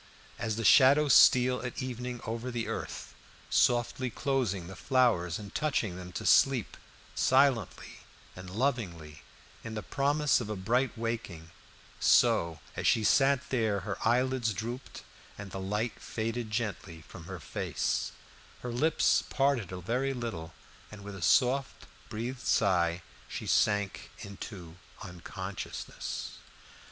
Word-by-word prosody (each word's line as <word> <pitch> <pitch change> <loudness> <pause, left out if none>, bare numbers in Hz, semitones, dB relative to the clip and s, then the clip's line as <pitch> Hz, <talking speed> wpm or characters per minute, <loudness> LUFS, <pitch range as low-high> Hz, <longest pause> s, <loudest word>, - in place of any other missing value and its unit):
As 110 -2 -2
the 115 0 -3
shadows 140 +4 +6
steal 125 0 +6
at 125 -1 -5
evening 125 -1 -5
over 115 +3 -4
the 120 -2 -3
earth, - - -5 0.4
softly 120 +1 +2
closing 120 -9 -1
the 95 +2 -9
flowers 115 - +2
and 100 -2 -10
touching 135 -11 -1
them 90 0 -8
to - - -5
sleep, 135 -6 +4 0.4
silently 130 - +1 0.4
and 90 0 -9
lovingly, 95 - -2 0.4
in 115 -1 -6
the 105 - -4
promise 145 -1 +1
of 110 - -5
a 105 - -2
bright 120 +7 0
waking 110 -8 -4 0.5
so, 85 -1 +3
as - - -1
she 110 - +3
sat 135 +3 +3
there, 110 -6 +1
her 95 0 -5
eyelids 120 -1 +1
drooped 120 +7 -6 0.3
and 100 -1 -8
the 95 - -5
light 105 +4 -2
faded 115 0 -3
gently 95 -7 -4
from 85 -3 -11
her 95 0 -7
face, - - -2 0.5
her 125 - -4
lips 150 +7 +2
parted 135 - +1
a 90 -1 -6
very 130 +8 -1
little, 110 -10 -5 0.4
and 105 -1 -10
with 100 0 -7
a 95 - -9
soft 130 - +2 0.2
breathed 120 +4 -4
sigh 85 -5 +2 0.3
she - - -5
sank 105 -2 +1
into 95 -4 -9 0.3
unconsciousness. 95 +1 -6
115 Hz, 135 wpm, -30 LUFS, 95-125 Hz, 0.5 s, shadows